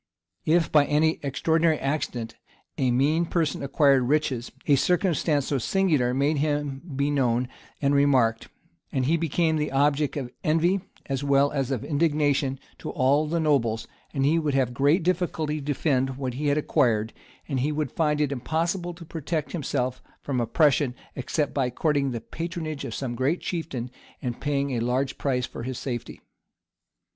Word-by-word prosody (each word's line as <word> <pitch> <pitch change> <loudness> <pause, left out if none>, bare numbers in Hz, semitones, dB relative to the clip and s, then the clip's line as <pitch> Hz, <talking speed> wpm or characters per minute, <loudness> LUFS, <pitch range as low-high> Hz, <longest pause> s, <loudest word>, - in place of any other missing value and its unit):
If, 165 0 +3
by 150 -2 +5
any 155 +3 +2
extraordinary 160 +3 +2
accident, 130 -5 -2 0.4
a 130 - +1
mean 150 +7 +2
person 160 -5 0
acquired 140 -1 +4
riches, 135 -4 0
a 145 - +5
circumstance 160 -2 +1
so 140 - 0
singular 150 -5 +2
made 140 +3 +1
him 145 -2 -1
be 140 +2 +1
known 125 -3 +1 0.4
and 140 +1 +3
remarked; 130 -6 +3 0.4
he 135 +5 +1
became 165 0 +1
the 150 0 -1
object 145 +2 +2
of 125 -4 -4
envy, 170 +5 +2 0.2
as 135 0 -2
well 140 0 +3
as 135 -3 -1
of 135 -1 -2
indignation, 145 -3 +1 0.2
to - - -6
all 140 +4 +2
the 165 +2 0
nobles; 130 -8 +1 0.2
he 145 +3 +2
would 150 -4 -1
have 130 -3 +1
great 145 +8 +3
difficulty 165 -4 0
to - - -7
defend 135 -3 0
what 130 -3 -3
he 145 +4 -2
had 145 +1 +2
acquired; 115 -8 +1 0.3
and 135 -4 -1
he 145 +4 0
would 150 -4 -2
find 150 -2 +1
it 150 -2 +1
impossible 170 +6 -2
to 170 0 -11
protect 160 -1 -3
himself 130 -6 -2 0.2
from 130 -4 -1
oppression, 140 +1 +2 0.2
except 145 +3 -1
by 135 -3 +1
courting 140 +1 +1
the 120 -3 -4
patronage 160 0 -5
of - - -5
some 130 -3 -3
great 130 +8 0
chieftain, 135 -8 -4 0.3
and 120 -2 -4
paying 140 -1 0
a 120 - -1
large 125 +3 -1
price 125 -3 0
for - - -8
his 130 +1 -4
safety. 120 -4 -5
145 Hz, 165 wpm, -26 LUFS, 130-155 Hz, 0.4 s, by